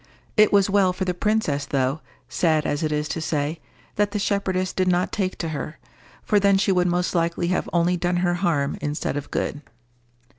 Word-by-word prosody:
It 215 Hz, -1 st, +5 dB
was 200 Hz, -1 st, +4 dB
well 195 Hz, -2 st, +3 dB
for 190 Hz, +1 st, -3 dB
the 180 Hz, -, 0 dB
princess, 180 Hz, -7 st, 0 dB
though, 135 Hz, +2 st, 0 dB, 0.3 s
sad 155 Hz, -3 st, +1 dB
as 145 Hz, -, -1 dB
it 155 Hz, -1 st, -1 dB
is 150 Hz, 0 st, -1 dB
to 165 Hz, -, -3 dB
say, 155 Hz, 0 st, -2 dB, 0.4 s
that 205 Hz, 0 st, +2 dB
the -, -, 0 dB
shepherdess 190 Hz, -2 st, -1 dB
did 185 Hz, -1 st, 0 dB
not 180 Hz, 0 st, +1 dB
take 190 Hz, -3 st, -2 dB
to 165 Hz, -, -3 dB
her, 155 Hz, +1 st, -5 dB, 0.5 s
for 210 Hz, -, +3 dB
then 200 Hz, -1 st, +4 dB
she 195 Hz, 0 st, +2 dB
would 180 Hz, -1 st, +2 dB
most 175 Hz, 0 st, 0 dB
likely 170 Hz, 0 st, 0 dB
have 185 Hz, -, -1 dB
only 175 Hz, +1 st, +2 dB
done 175 Hz, +1 st, 0 dB
her 175 Hz, -, +2 dB
harm 170 Hz, -6 st, 0 dB
instead 150 Hz, -1 st, -2 dB
of 145 Hz, -1 st, -5 dB
good. 145 Hz, -, -2 dB
175 Hz, 200 wpm, -23 LUFS, 155-190 Hz, 0.5 s, It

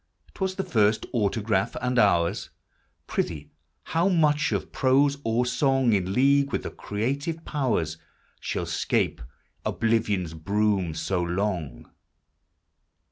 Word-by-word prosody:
'T -, -, -18 dB
was 190 Hz, 0 st, 0 dB
the 190 Hz, -, -2 dB
first 110 Hz, -, +2 dB
autograph: 105 Hz, -3 st, 0 dB
and 125 Hz, 0 st, 0 dB
ours? 85 Hz, -5 st, +2 dB, 0.6 s
Prithee, 75 Hz, -3 st, -3 dB, 0.3 s
how 170 Hz, +4 st, +1 dB
much 155 Hz, -4 st, +2 dB
of -, -, -2 dB
prose 140 Hz, +2 st, +3 dB
or 115 Hz, +2 st, +1 dB
song, 135 Hz, -2 st, +2 dB
In 95 Hz, -2 st, 0 dB
league 140 Hz, +3 st, +3 dB
with -, -, -1 dB
the -, -, -5 dB
creative 140 Hz, +10 st, -3 dB
powers, 115 Hz, -, -1 dB, 0.4 s
Shall -, -, -3 dB
'scape -, -, 0 dB, 0.4 s
Oblivion's 105 Hz, -7 st, 0 dB
broom 100 Hz, 0 st, 0 dB
so 90 Hz, +2 st, -1 dB
long 90 Hz, -3 st, -3 dB
110 Hz, 120 wpm, -26 LUFS, 95-140 Hz, 0.6 s, prose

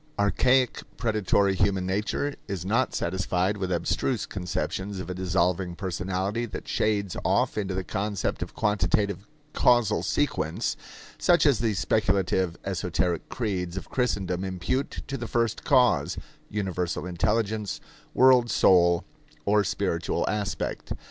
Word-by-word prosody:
Archaic, 125 Hz, +5 st, +2 dB, 0.2 s
predatory 105 Hz, -3 st, +2 dB
human 95 Hz, 0 st, +1 dB
nature 105 Hz, +9 st, -1 dB
is 95 Hz, -4 st, -4 dB
not 115 Hz, +7 st, +1 dB
satisfied 95 Hz, +2 st, 0 dB
with 95 Hz, -2 st, -3 dB
abstruse 95 Hz, +8 st, 0 dB
conceptions 95 Hz, +2 st, -3 dB
of 90 Hz, -, -5 dB
a -, -, -2 dB
dissolving 90 Hz, -1 st, 0 dB
personality 95 Hz, +5 st, -2 dB
that -, -, -7 dB
shades 100 Hz, -3 st, 0 dB
off -, -, +2 dB
into 100 Hz, -3 st, -2 dB
the 95 Hz, -, -2 dB
concept 100 Hz, +1 st, -2 dB
of -, -, -5 dB
quantitative 105 Hz, -2 st, 0 dB, 0.3 s
causal 120 Hz, -4 st, +3 dB
sequence, 110 Hz, -, -1 dB, 0.4 s
such 170 Hz, -4 st, +4 dB
as 140 Hz, -6 st, +4 dB
the 110 Hz, -2 st, 0 dB
speculative, 95 Hz, -3 st, +1 dB
esoteric 90 Hz, -3 st, -1 dB
creeds 95 Hz, -7 st, -3 dB
of 95 Hz, -, -7 dB
Christendom 95 Hz, -8 st, -1 dB
impute 95 Hz, +8 st, -2 dB
to 135 Hz, -, -4 dB
the 120 Hz, -, -5 dB
First 115 Hz, -1 st, 0 dB
Cause, 125 Hz, -4 st, +3 dB, 0.3 s
Universal 90 Hz, -4 st, -2 dB
Intelligence, 105 Hz, +3 st, -1 dB, 0.4 s
World 125 Hz, -2 st, +6 dB
Soul, 85 Hz, -4 st, +4 dB, 0.4 s
or 105 Hz, +1 st, +4 dB
Spiritual 90 Hz, -3 st, -1 dB
Aspect. 105 Hz, -1 st, -2 dB
100 Hz, 125 wpm, -26 LUFS, 90-110 Hz, 0.4 s, World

